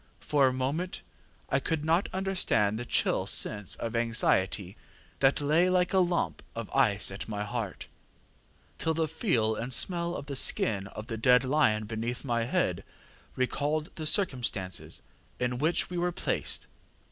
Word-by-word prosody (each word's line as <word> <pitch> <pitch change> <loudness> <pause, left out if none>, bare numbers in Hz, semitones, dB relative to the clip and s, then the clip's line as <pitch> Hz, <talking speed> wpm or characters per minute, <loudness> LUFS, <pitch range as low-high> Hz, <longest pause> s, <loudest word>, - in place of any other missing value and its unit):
For 140 -3 +3
a - - +2
moment 140 +8 -2 0.5
I 135 - +3
could 155 +2 -2
not 165 +4 +2
understand 185 - +1
the 120 - -6
chill - - +1
sense 105 -3 -1
of 115 0 -4
anxiety 105 -5 +1 0.4
that 135 +2 +3
lay 160 +5 +3
like 180 0 +2
a 190 - +5
lump 175 -1 0
of 115 -2 -6
ice 105 -8 +3
at 95 +3 -7
my 105 -1 -2
heart, 105 -2 -4 0.9
till 160 0 +1
the 160 0 +1
feel 150 - +1
and 120 +3 -4
smell 170 +7 0
of - - -6
the 140 -1 -5
skin 100 -6 +1
of 105 +2 -8
the 115 -1 -5
dead 125 +2 +5
lion 130 -6 +2
beneath 115 +4 -4
my 115 -2 0
head - - 0 0.5
recalled 150 +4 -1
the 155 -1 -4
circumstances 125 - -1 0.4
in 125 0 -1
which 160 +4 +2
we 175 - -2
were 175 +1 +1
placed. - - 0
130 Hz, 160 wpm, -29 LUFS, 110-160 Hz, 0.9 s, a